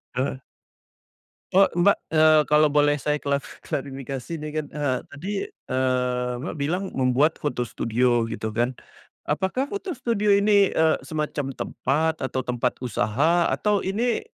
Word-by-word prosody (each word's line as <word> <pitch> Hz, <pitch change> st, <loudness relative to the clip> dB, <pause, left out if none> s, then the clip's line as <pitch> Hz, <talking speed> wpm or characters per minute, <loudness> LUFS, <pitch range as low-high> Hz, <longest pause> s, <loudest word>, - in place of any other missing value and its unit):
Heeh. 130 Hz, +1 st, -1 dB, 1.2 s
Oh, 195 Hz, -, +8 dB, 0.2 s
Mbak, 200 Hz, +3 st, +5 dB, 0.2 s
eee, 155 Hz, -1 st, +5 dB
kalau 150 Hz, 0 st, +6 dB
boleh 145 Hz, 0 st, +2 dB
saya 150 Hz, +1 st, 0 dB
klaf 140 Hz, -1 st, +1 dB, 0.2 s
klarifikasi 135 Hz, 0 st, -5 dB
ini 155 Hz, -1 st, -6 dB
kan, 155 Hz, 0 st, -2 dB
eee, 145 Hz, -3 st, -1 dB
tadi, 155 Hz, +8 st, -8 dB, 0.2 s
eee, 125 Hz, -1 st, -1 dB
Mbak 170 Hz, -, -4 dB
bilang 165 Hz, +7 st, -1 dB
membuat 135 Hz, +5 st, +2 dB
foto 125 Hz, -4 st, -1 dB
studio, 120 Hz, +1 st, +1 dB
gitu 110 Hz, -1 st, -4 dB
kan. 120 Hz, +4 st, -1 dB, 0.5 s
Apakah 190 Hz, -, -1 dB
foto 400 Hz, -2 st, -4 dB
studio 230 Hz, -4 st, -1 dB
ini, 200 Hz, -1 st, +4 dB
eee, 160 Hz, 0 st, +3 dB
semacam 150 Hz, -2 st, -2 dB
tempat, 155 Hz, +6 st, -1 dB
atau 130 Hz, -1 st, -2 dB
tempat 125 Hz, 0 st, -1 dB
usaha, 140 Hz, +9 st, +1 dB
atau 210 Hz, -1 st, +1 dB
ini, 225 Hz, +6 st, 0 dB
145 Hz, 140 wpm, -24 LUFS, 130-170 Hz, 1.2 s, Oh